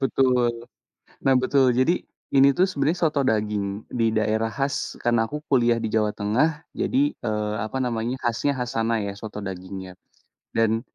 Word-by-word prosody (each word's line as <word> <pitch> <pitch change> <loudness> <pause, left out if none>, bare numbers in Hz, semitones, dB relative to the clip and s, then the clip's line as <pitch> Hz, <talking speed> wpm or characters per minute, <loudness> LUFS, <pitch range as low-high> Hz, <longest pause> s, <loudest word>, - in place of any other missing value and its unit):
Betul. 125 -3 +1 0.6
Nah, 135 - +5
betul, 130 -1 +3
jadi 130 +8 +2 0.3
ini 135 0 +7
tuh 180 - +5
sebenarnya 150 +1 0
soto 150 -2 0
daging 105 -2 -1
di 115 -2 +2
daerah 110 +1 +1
khas 140 +1 -2
karena 120 -1 +2
aku 150 +3 -6
kuliah 120 -3 +4
di 110 - -1
Jawa 105 -1 +2
Tengah 150 +10 0
jadi, 285 +3 +1
eee, 105 -2 -2
apa 110 +4 -4
namanya 120 +1 -2
khasnya 120 +4 +1
khas 125 -2 -3
sana, 115 +1 +1
ya, 100 - -3
soto 105 0 -7
dagingnya. 95 0 -7 0.6
Dan 115 0 +2
120 Hz, 160 wpm, -24 LUFS, 110-135 Hz, 0.6 s, ini